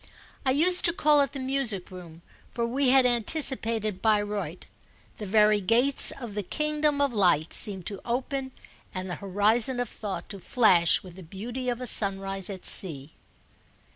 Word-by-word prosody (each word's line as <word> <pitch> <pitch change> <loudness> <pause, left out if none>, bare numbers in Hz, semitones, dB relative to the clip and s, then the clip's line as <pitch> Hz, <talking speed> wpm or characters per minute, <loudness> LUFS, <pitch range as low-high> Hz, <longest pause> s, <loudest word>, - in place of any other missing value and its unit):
I - - +3
used 350 +7 +2
to 340 - +4
call 300 -3 +2
it 275 - -2
the 275 - -8
music 260 -9 -2
room, 170 -2 -13 0.3
for 235 0 -4
we 260 +3 -1
had 265 0 +3
anticipated 230 - +1
Bayreuth. 205 -6 -2 0.5
The 210 - -8
very 210 +1 +2
gates 240 +8 +6
of 240 -6 -4
the 210 - -4
kingdom 300 - -2
of 280 -3 -1
light 175 -7 0
seemed 190 -4 -1
to 200 -2 -7
open 265 +2 -5 0.4
and 185 0 -6
the - - -4
horizon 215 +6 +1
of 245 -2 -4
thought 195 -5 -8
to 200 - -8
flash 185 -4 +1
with 180 -1 -13
the - - -11
beauty 235 +9 -7
of 240 -1 -4
a 250 - -6
sunrise 195 -3 +1
at 190 -2 -9
sea. 155 -5 +3
215 Hz, 170 wpm, -25 LUFS, 190-260 Hz, 0.5 s, gates